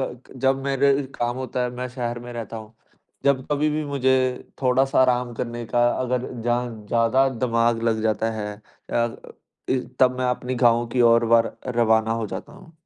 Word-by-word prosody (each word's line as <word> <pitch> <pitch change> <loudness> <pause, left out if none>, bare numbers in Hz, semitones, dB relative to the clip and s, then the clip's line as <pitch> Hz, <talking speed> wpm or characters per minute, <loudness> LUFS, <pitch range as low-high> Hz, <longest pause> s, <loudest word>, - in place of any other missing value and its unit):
कक 130 -1 -6
जब 135 +1 +1
मेरे 140 0 +3 0.2
काम 120 0 -2
होता 130 -1 -3
है 125 - -2
मैं 125 +1 -4
शहर 120 -2 -3
में 120 0 -9
रहता 115 -1 -6
हूँ, 110 0 -10 0.5
जब 135 -2 +2
कभी 150 +1 +1
भी 155 +1 -1
मुझे 135 -2 +1 0.5
थोड़ा-सा 130 +1 +3
आराम 125 -1 +2
करने 120 0 -4
का 120 +1 +2
अगर 125 0 -1 0.2
जहाँ 120 +1 0 0.2
ज़्यादा 120 +3 +3
दिमाग 115 -2 0
लग 110 -1 +1
जाता 110 0 0
है 105 -1 -4 0.4
अ, 120 -1 0 0.5
इ 130 - +2 0.2
तब 130 -1 +4
मैं 130 - 0
अपनी 125 +1 -3
गाँवों 120 0 +4
की 125 +2 -1
ओर 115 0 +4
वार 115 0 +2 0.2
रवाना 110 -1 +3
हो 115 -1 -2
जाता 95 0 -7
हूँ। 165 - -15
120 Hz, 180 wpm, -23 LUFS, 115-130 Hz, 0.5 s, तब